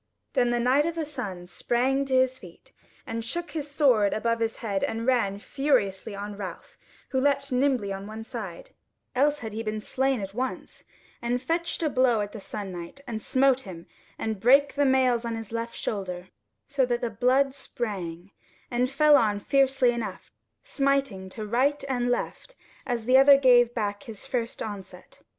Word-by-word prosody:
Then 250 -3 +3
the 240 0 +1
Knight 260 +6 +3
of 335 - -3
the 325 -2 -2
Sun 205 -12 -6
sprang 260 +8 0
to 265 -1 0
his 260 0 +2
feet, 175 -3 -15 0.3
and 230 0 -4
shook 345 +9 -4
his 300 -2 -4
sword 260 -9 +3
above 230 +1 0
his 225 0 -1
head 200 -4 -2
and 225 +1 -2
ran 235 -6 +2
furiously 215 -5 0
on 205 +1 -6
Ralph, 195 -3 -8 0.3
who 260 - 0
leapt 280 0 +1
nimbly 250 -6 +1
on 195 +1 -7
one 220 +1 -7
side - - -7 0.4
(else 290 +3 +3
had 220 - -5
he 220 - -3
been 215 -1 -3
slain 265 +3 0
at 195 -1 -6
once) 255 +4 -5 0.4
and 240 +1 0
fetched 335 +5 -2
a - - +3
blow 255 -4 +3
at 205 0 -4
the 220 - -8
Sun 200 -1 -6
Knight, 175 +9 -8
and 225 -3 -5
smote 265 +1 +3
him, 175 -6 -10 0.3
and 220 -2 -3
brake 275 +6 +5
the 285 0 +2
mails 255 -3 +3
on 230 -1 -3
his 225 -2 -7
left 230 0 -4
shoulder, 185 -3 -4 0.4
so 280 -2 0
that 240 -1 0
the 240 -2 -2
blood 260 +5 +2
sprang, 195 -9 -5 0.4
and 250 +1 +1
fell 300 +2 +5
on 210 -6 +3
fiercely 270 +1 +3
enough, 215 -6 -5 0.3
smiting 275 -9 0
to 215 +3 -6
right 265 +7 +1
and 245 -2 0
left 375 - -3 0.3
as 240 -3 -2
the 255 +2 +6
other 275 +1 +8
gave 245 -3 +5
back 205 -3 -1
at - - -17
his 220 -3 -8
first 235 -2 -3
onset. 200 -3 -9
240 Hz, 185 wpm, -26 LUFS, 210-270 Hz, 0.4 s, other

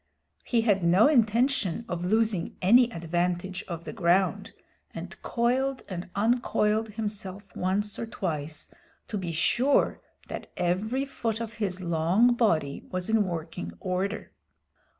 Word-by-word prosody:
He 235 -2 +1
had 205 -5 +2
no 180 +7 +6
intention 235 - +2
of 175 -3 -3
losing 210 -2 +1
any 240 +6 +5
advantage 175 +1 -2
of 170 -2 -6
the - - -6
ground, 185 -2 +1 0.4
and - - -6
coiled 255 +3 0
and 180 -2 -6
uncoiled 220 0 +2
himself 205 -2 -5
once 200 +3 -1
or 230 - -3
twice, 155 -8 -4 0.4
to 210 - -2
be 175 -3 -3
sure 245 - +2 0.3
that - - -7
every 215 +10 0
foot 230 -5 -3
of 230 -1 -5
his 195 -5 -3
long 175 +8 +3
body 165 - +1
was 185 +3 -2
in 220 -2 +3
working 160 - -5
order. 190 +3 -2
200 Hz, 130 wpm, -27 LUFS, 175-230 Hz, 0.4 s, no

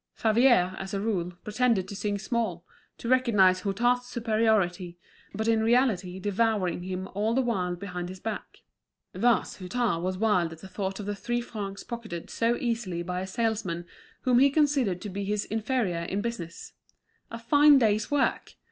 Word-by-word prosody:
Favier, 220 -5 +3
as 195 +1 -5
a - - -1
rule, 190 -5 -1
pretended 215 -3 +1
to 200 - -7
sing 205 0 -2
small, 205 -5 -2 0.3
to - - -7
recognise 215 -8 +4
Hutin's 240 +6 +1
superiority, 215 -7 0 0.4
but 220 +2 -2
in 225 -1 +3
reality 220 -6 +2
devouring 205 -3 0
him 185 +1 -4
all 215 +4 0
the 265 - +3
while 185 -7 -1
behind 180 -1 -6
his 185 0 -9
back. 220 +2 -6 0.5
Thus 225 +2 +1
Hutin 195 -1 -1
was 185 +1 -2
wild 185 -6 +1
at 160 - -14
the - - -9
thought 195 0 -4
of 205 - -5
the 205 - -2
three 240 +3 -2
francs 205 -4 -6
pocketed 220 -8 -7
so 235 +1 +1
easily 225 -8 -2
by 180 +1 -3
a 190 - -4
salesman 205 -5 -2 0.4
whom 250 -2 +3
he 275 +2 +6
considered 275 - +1
to 210 - -5
be 200 +2 -4
his 205 +1 -1
inferior 220 -5 -1
in 195 +4 -2
business. 185 -7 -6 0.6
A 230 - -6
fine 290 +5 +6
day's 215 -4 +2
work! 290 -2 0
210 Hz, 170 wpm, -27 LUFS, 185-235 Hz, 0.6 s, he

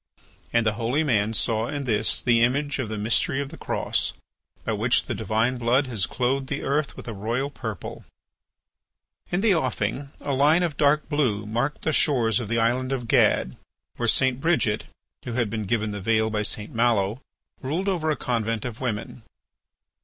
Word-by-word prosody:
And 115 -1 +2
the 110 - +2
holy 125 +7 +1
man 110 -5 +1
saw 110 +1 +1
in 145 +1 -3
this 110 -4 +1
the 120 -2 +4
image 140 +4 +1
of 125 -5 -2
the 110 - -4
mystery 110 +5 +1
of 140 -1 -3
the - - -10
Cross, - - -1 0.5
by - - -1
which - - +2
the - - -3
divine 115 +3 0
blood 125 +4 +3
has 115 -7 -1
clothed 130 +2 -1
the - - -3
earth 140 +1 -1
with - - -9
a 115 - -4
royal 115 +7 -2
purple. 110 -8 -6 1.3
In 175 +2 +1
the 215 -2 +4
offing 130 - -1
a 140 - -3
line 150 +6 +4
of 165 -4 -1
dark 150 +1 +3
blue 125 -9 0
marked 120 +7 -2
the 155 - +1
shores 125 -7 +3
of 120 - -4
the 115 +2 0
island 125 +3 +1
of 125 -3 -2
Gad, 65 - +3 0.4
where 120 - -1
St. 130 +1 +2
Bridget, 120 -11 +1 0.4
who 120 - -5
had 115 -3 0
been 110 -2 -3
given 110 0 0
the 105 -1 -5
veil 110 +2 +2
by 105 -1 0
St. 105 0 -2
Malo, 115 -1 +1 0.4
ruled 160 +9 -2
over 170 -5 0
a 155 - +2
convent 115 -3 -2
of 120 -1 -6
women. 120 -1 -3
120 Hz, 185 wpm, -25 LUFS, 110-140 Hz, 1.3 s, the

